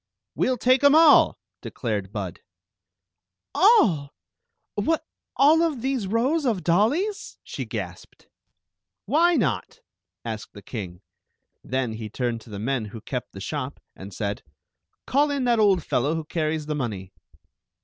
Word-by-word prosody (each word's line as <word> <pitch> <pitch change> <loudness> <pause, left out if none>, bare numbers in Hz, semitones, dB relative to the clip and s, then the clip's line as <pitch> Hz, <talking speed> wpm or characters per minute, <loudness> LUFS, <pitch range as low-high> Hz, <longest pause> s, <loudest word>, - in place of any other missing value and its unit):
" - - -62
We - - +1
'11 255 -1 +1
take 255 +4 +3
'em 285 +1 +7
all," 320 -1 +6 0.2
declared 105 -5 -4
Bud. 95 -5 -5 1.1
"All! 230 - +4 0.6
What 325 -1 0 0.2
— - - -31
all 315 +2 +4
these 255 -4 -2
rows 255 +10 +1
of 225 -9 0
dollies?" 275 - +1
she - - -6
gasped. - - -7 0.4
" - - -62
Why 345 +2 +5
not? 205 - -1 0.2
" 90 +1 -62
asked 110 -2 -6
the 100 - -12
king. 95 -5 -7 0.6
Then 130 -2 -2
he 110 -1 -6
turned 120 0 -2
to 115 - -16
the 105 - -7
men 120 +2 -1
who 105 +2 -9
kept 125 +1 -5
the 95 - -9
shop 135 +6 -4 0.2
and 95 +1 -10
said: 100 +2 -3 0.3
" - - -53
Call 290 +3 +2
in 280 -2 -1
that 240 -2 +2
old 195 -6 +4
fellow 140 +6 0
who 160 -1 -4
carries 155 -1 -2
the 150 - -2
money." 105 -9 -4
155 Hz, 160 wpm, -24 LUFS, -, 1.1 s, em